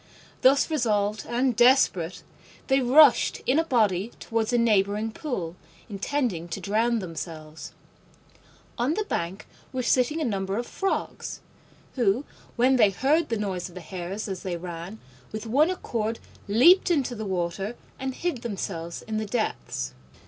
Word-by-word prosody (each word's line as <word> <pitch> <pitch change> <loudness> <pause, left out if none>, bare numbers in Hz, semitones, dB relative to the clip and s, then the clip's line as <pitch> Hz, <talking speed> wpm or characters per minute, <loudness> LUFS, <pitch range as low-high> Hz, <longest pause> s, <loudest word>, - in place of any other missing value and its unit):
Thus 275 +4 +4
resolved 210 -7 0
and 245 +1 +1
desperate, 240 -8 +3 0.5
they 270 0 +4
rushed 270 +2 +5
in 270 +5 +3
a - - +3
body 220 - +1
towards 225 0 -1
a 245 - +3
neighbouring 215 -1 +2
pool, 190 - -4 0.3
intending 205 - -2
to 170 +3 -5
drown 220 +5 +1
themselves. 160 -4 -7 1.1
On 260 +7 +1
the 430 - 0
bank 185 - -4 0.2
were 255 -1 -2
sitting 255 +6 +2
a 310 - 0
number 195 -3 -1
of 240 - -2
Frogs, 390 +8 -3 0.5
who, 240 +1 +1 0.3
when 255 +2 +4
they 215 -4 +6
heard 290 - +1
the 230 - 0
noise 190 -4 -3
of 175 - -16
the - - -6
Hares 185 +4 -5
as 190 -3 -5
they 180 -2 -3
ran, 175 +3 -7 0.3
with 215 0 -5
one 280 +9 +3
accord 230 -11 -2 0.3
leaped 315 - +6
into 280 -7 +1
the 220 -2 -5
water 190 +4 -2 0.2
and 265 -1 -3
hid 340 -9 -2
themselves 180 -7 -5
in 220 -1 -3
the 215 0 -2
depths. 130 - -2
220 Hz, 150 wpm, -26 LUFS, 190-255 Hz, 1.1 s, they